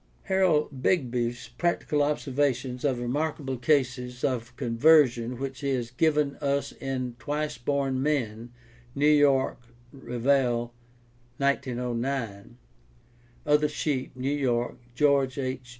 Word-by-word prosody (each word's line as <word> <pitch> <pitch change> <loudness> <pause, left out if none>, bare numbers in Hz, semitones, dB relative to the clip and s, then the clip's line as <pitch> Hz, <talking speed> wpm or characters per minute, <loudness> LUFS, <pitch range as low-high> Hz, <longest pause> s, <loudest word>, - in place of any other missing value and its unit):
Harold 155 -8 +1
Begbie's 120 -7 0
practical 170 -3 0
observa 145 -2 +1
tions 125 0 -7
of 135 -4 +1
remarkable 135 +2 -2
cases 125 -1 0
of 120 -2 -2
conversion 125 -1 +3
which 135 0 -5
he 140 - -2
has 120 -2 -4
given 150 +1 +1
us 140 -1 -1
in 130 -2 -3
Twice 150 -1 -3
Born 135 0 0
Men 120 -6 -1 0.4
(New 140 +1 +1
York: 145 -4 +4 0.3
Revell, 125 -2 0 0.6
1909), 125 -4 -2 0.9
Other 150 0 +3
Sheep 145 -4 -2
(New 130 +3 -1
York: 120 -4 -1 0.2
George 140 0 +2
H. 130 -2 -4
135 Hz, 110 wpm, -27 LUFS, 125-145 Hz, 0.9 s, York